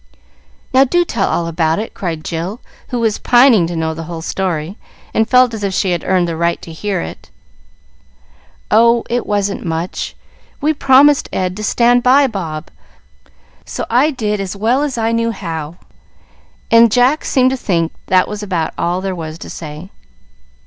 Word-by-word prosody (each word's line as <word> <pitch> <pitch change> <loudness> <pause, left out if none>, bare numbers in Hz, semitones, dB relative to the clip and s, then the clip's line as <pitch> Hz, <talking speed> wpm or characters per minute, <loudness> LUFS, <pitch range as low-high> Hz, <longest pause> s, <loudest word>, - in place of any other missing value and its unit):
"Now 260 +1 +6
do 350 +6 +2
tell 225 - -1
all 170 - 0
about 165 -1 0
it," 220 - -5
cried 165 -4 -4
Jill, 175 +7 -4 0.3
who 245 - -3
was 225 -2 0
pining 240 -8 +5
to 175 - -5
know 160 0 -1
the 165 0 -7
whole 165 -1 -7
story, 175 -1 -3 0.4
and 220 0 +1
felt 250 -1 +4
as 215 -2 -5
if 195 -2 -1
she 190 - +1
had 175 -2 -1
earned 185 -2 +1
the 165 - -3
right 170 +1 0
to 165 - -9
hear 200 +5 -2
it. 80 - -9 1.4
"Oh, 235 +2 +4
it 245 0 -1
wasn't 200 -1 -1
much. 165 +1 -4 0.4
We 310 +2 +1
promised 280 0 +4
Ed 185 -1 -2
to 215 - -6
stand 240 +3 +3
by 265 +3 +5
Bob, 170 - -5 0.9
so - - -5
I 255 +6 +4
did 215 -7 -2
as 195 0 -4
well 230 +7 +1
as 290 -4 -2
I 225 0 0
knew 230 0 0
how;" 165 -6 -5 0.9
and 230 -1 +6
Jack 250 +6 +3
seemed 260 -1 +2
to - - 0
think 170 -9 -1
that 185 0 +3
was 210 0 -6
about 180 -6 -2
all 175 +2 -1
there 190 0 -3
was 160 -2 -6
to - - -9
say. 155 +3 -8
200 Hz, 175 wpm, -16 LUFS, 170-240 Hz, 1.4 s, Now